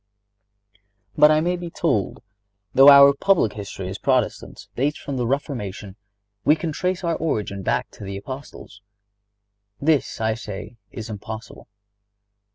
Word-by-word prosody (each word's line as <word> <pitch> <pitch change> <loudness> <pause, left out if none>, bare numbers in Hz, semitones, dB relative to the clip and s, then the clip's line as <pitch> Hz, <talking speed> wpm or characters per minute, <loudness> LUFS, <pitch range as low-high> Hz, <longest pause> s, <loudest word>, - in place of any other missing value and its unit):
But 150 - +7
I 155 0 +3
may 175 +2 0
be 175 -1 -6
told: 140 - -1 0.5
"Though 135 +2 +8
our 140 0 +9
public 165 - +2
history 100 -2 -7
as 95 +2 -6
Protestants 130 -4 -1
dates 145 +4 0
from 140 -2 -5
the 120 -2 -1
Reformation, 105 -8 -4 0.5
we 150 - +5
can 160 0 -4
trace 180 +4 -2
our 170 -1 0
origin 105 -10 -2
back - - -1
to - - -12
the 100 0 -5
Apostles." 120 -2 -10 1.0
This 150 -1 +1
I 110 0 +1
say 110 0 -8
is 110 -1 -7
impossible. 110 +2 -9
130 Hz, 140 wpm, -22 LUFS, 105-155 Hz, 1.0 s, our